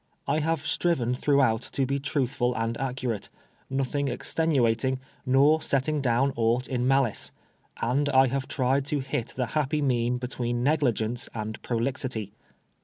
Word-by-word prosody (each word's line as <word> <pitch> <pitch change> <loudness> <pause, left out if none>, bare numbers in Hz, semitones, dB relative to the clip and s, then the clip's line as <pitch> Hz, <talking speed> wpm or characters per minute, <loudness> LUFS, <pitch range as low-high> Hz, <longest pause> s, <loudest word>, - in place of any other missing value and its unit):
I 155 - +2
have 160 -1 -1
striven 145 -7 +1
throughout 130 -4 +2
to 135 - +1
be 140 +2 -1
truthful 130 -3 0
and 115 +1 -1
accurate, 125 -5 -3 0.4
nothing 135 +1 -1
extenuating, 130 -4 +1 0.3
nor 140 +5 +5
setting 145 +2 0
down 130 +2 +2
aught 120 +2 +1
in 125 -1 -1
malice; 135 -4 +2 0.5
and 140 +5 +1
I 135 -1 +6
have 135 +1 -2
tried 135 +1 +1
to 150 -3 0
hit 135 -2 -3
the 130 - +1
happy 150 0 +1
mean 125 -2 +1
between 120 -1 -2
negligence 120 -6 +1
and 110 0 -5
prolixity. 120 -3 -2
130 Hz, 140 wpm, -27 LUFS, 120-140 Hz, 0.5 s, I